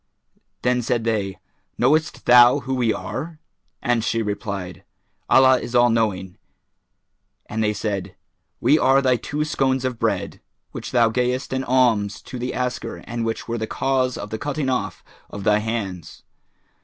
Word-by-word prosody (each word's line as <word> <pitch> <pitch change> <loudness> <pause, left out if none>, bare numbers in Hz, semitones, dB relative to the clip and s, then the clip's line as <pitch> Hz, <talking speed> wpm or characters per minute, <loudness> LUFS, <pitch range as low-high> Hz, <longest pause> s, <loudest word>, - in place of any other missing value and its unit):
Then 125 0 +2
said 120 0 -1
they, 105 -4 -1 0.4
"Knowest 155 +2 +1
thou 120 +3 +7
who 130 +2 -4
we 120 -3 +1
are?"; 155 +8 -5 0.5
and 120 -3 +1
she 115 -1 0
replied, 100 -4 -5 0.5
"Allah 130 -1 +6
is 120 - -6
all 120 -1 +5
knowing;"[FN#412] 95 -5 -1 1.1
and 110 +1 -2
they 105 0 +1
said, 100 -3 -4 0.4
"We 155 +3 +4
are 135 +1 +4
thy 130 -2 +3
two 150 +5 -3
Scones 130 -3 0
of 125 -3 -3
Bread, - - -2 0.3
which - - -6
thou 120 -2 +3
gayest 125 +3 -1
in 130 0 -1
alms 115 -6 +1
to 125 - -8
the 125 +1 -3
asker 125 0 -4
and 115 0 -4
which 115 0 -3
were 120 0 -3
the 110 - -3
cause 130 0 0
of 105 - -7
the 110 - -4
cutting 145 -1 -2
off 125 -1 -2 0.3
of 100 - -7
thy 105 +1 +3
hands. 100 -7 -5
120 Hz, 160 wpm, -22 LUFS, 105-130 Hz, 1.1 s, thou